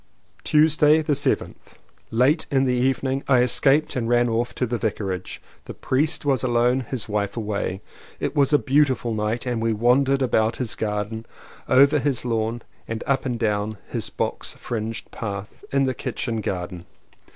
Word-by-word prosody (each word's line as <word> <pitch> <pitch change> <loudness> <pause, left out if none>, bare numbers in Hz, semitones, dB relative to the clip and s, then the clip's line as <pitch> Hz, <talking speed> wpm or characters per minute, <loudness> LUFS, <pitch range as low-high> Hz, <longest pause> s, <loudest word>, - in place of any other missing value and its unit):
Tuesday 155 0 +4
the 150 - +1
7th. - - -1 0.3
Late 130 +8 +2
in 135 -1 +2
the 125 - +1
evening 130 +2 0
I 130 -3 +5
escaped 135 +4 +2
and 120 -3 -1
ran 120 0 +3
off 115 +2 -1
to 125 - 0
the 120 0 -3
Vicarage. 100 -4 -3 0.3
The - - -8
priest 150 +4 0
was 135 -3 +2
alone, 120 +1 +2
his 125 -2 -4
wife 105 0 -2
away. 105 -3 -3 0.4
It - - -3
was 140 -1 +3
a 145 - +6
beautiful 135 -4 +1
night 110 +3 -2
and 120 -2 -1
we 115 0 +1
wandered 130 +5 +3
about 110 -3 +1
his 125 -4 -3
garden, 105 +1 -3 0.4
over 140 +3 +5
his 135 -2 -1
lawn 115 0 -1 0.2
and 115 0 -4
up 135 -1 0
and 120 -2 -2
down 105 -1 -1
his - - -4
box - - -3
fringed 115 -1 -5
path 100 -2 -6
in 140 0 +2
the 130 - 0
kitchen 115 -1 -3
garden. 90 -3 -5
120 Hz, 165 wpm, -23 LUFS, 110-135 Hz, 0.4 s, a